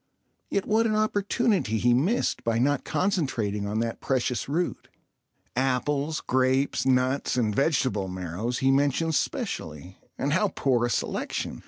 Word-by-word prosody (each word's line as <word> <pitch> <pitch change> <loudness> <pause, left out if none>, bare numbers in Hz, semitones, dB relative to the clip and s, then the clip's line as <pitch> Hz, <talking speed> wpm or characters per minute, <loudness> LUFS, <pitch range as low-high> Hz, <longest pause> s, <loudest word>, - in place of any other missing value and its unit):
Yet 200 - -1
what 225 +2 +2
an 215 - 0
opportunity 205 - +1
he 120 +2 +3
missed 170 - +1
by 115 -1 +1
not 140 +4 +1
concentrating 120 - -1
on 105 +1 -2
that 115 0 -3
precious 130 -1 -1
root. 170 +5 -2 0.7
Apples, 140 +4 0
grapes, 130 +1 +1
nuts, 130 +1 +1
and 110 -4 +1
vegetable 130 - +1
marrows 95 +6 -3
he 135 - +5
mentions 145 +3 +2
specially—and 95 - -4
how 205 +5 +3
poor 120 -3 +2
a - - -4
selection! - - -2
130 Hz, 135 wpm, -26 LUFS, 115-160 Hz, 0.7 s, he